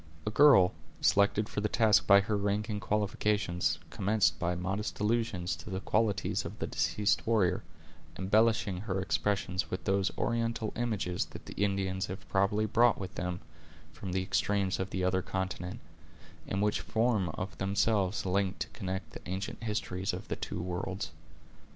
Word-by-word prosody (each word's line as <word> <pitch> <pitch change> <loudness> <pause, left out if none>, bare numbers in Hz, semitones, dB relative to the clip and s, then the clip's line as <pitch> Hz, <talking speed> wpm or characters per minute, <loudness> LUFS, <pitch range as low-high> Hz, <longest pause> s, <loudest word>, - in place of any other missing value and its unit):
A 105 - -1
girl, 120 -9 +7 0.3
selected 100 +1 +3
for - - -3
the 105 - 0
task 110 -1 +4
by 100 0 +8
her 105 +2 -1
rank 105 +2 0
and 105 -1 -2
qualifications, 105 -3 0
commenced 100 -6 +2
by 90 0 0
modest 95 +4 -3
allusions 105 -5 0
to 80 - -10
the 95 -1 -2
qualities 105 0 0
of - - -7
the - - -2
deceased 105 0 0
warrior, 105 -6 +2 0.6
embellishing 105 0 +2
her 95 0 -2
expressions 95 -2 -1
with 90 -1 -4
those 100 -1 +1
oriental 115 -1 -1
images 105 -7 -1
that - - -11
the - - -8
Indians 95 -1 0
have 95 +1 -7
probably 105 +2 +2
brought 115 +2 +4
with 95 -1 -6
them 90 0 -3 0.5
from 95 - -6
the 95 +1 0
extremes 95 0 0
of 95 +1 -2
the 95 -1 -2
other 95 0 +2
continent, 95 +2 -4 0.7
and 100 +1 0
which 105 - +1
form 110 -5 +1
of 95 +1 -5
themselves 100 0 +1
a - - -1
link 95 0 +1
to - - -4
connect 95 0 -5
the - - -9
ancient 95 +4 -4
histories 105 -3 -2
of - - -7
the - - -1
two - - -5
worlds. 90 +2 -3
100 Hz, 165 wpm, -31 LUFS, 95-105 Hz, 0.7 s, by